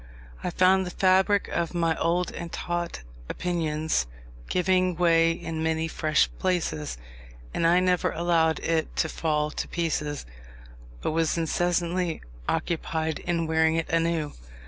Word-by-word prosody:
I - - 0
found 185 +2 +4
the 180 - -8
fabric 190 +1 +4
of 170 0 -2
my 165 -1 +2
old 175 +2 +1
and 170 -1 -7
taught 175 - -3 0.3
opinions 160 - -1 0.4
giving 185 0 +2
way 165 -1 +4
in 165 -1 -4
many 160 0 0
fresh 155 -1 +2
places, 80 - -1 0.6
and 165 - +2
I 175 +2 +5
never 180 -1 +2
allowed 165 -1 +2
it 160 -1 -1
to - - +1
fall 150 -2 -1
to - - -4
pieces, 150 -3 -2 0.8
but - - -1
was 165 +1 +1
incessantly 175 +1 0 0.3
occupied 160 -1 -1
in 170 -1 -1
weaving 160 0 +2
it 165 -1 -1
anew. 165 -2 0
165 Hz, 135 wpm, -26 LUFS, 160-175 Hz, 0.8 s, I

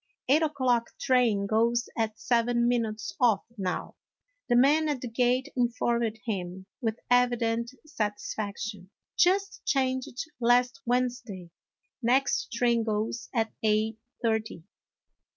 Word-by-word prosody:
" - - -64
Eight 295 +4 +5
o'clock 260 -6 +1
train 240 -6 +2
goes 230 +3 +1
at 220 -1 -1
seven 235 0 +2
minutes 225 -3 -1
of, 230 -5 +4
now," 190 -4 -4 0.5
the 240 - +4
man 295 +5 +4
at 290 -3 -1
the 250 - -4
gate 245 +2 +1
informed 235 -2 0
him 190 -4 -4 0.2
with 225 -1 -1
evident 235 -2 +2 0.2
satisfaction; 205 - -4
" - - -64
just 395 +2 0
changed 260 -1 -1
last 245 +1 +3
Wednesday; 240 -8 -2 0.5
next 260 +4 +1
train 235 -1 +2
goes 220 +1 -2
at 225 -3 -1
eight 220 0 +1 0.2
thirty." 220 -6 -1
235 Hz, 120 wpm, -28 LUFS, 220-250 Hz, 0.5 s, Eight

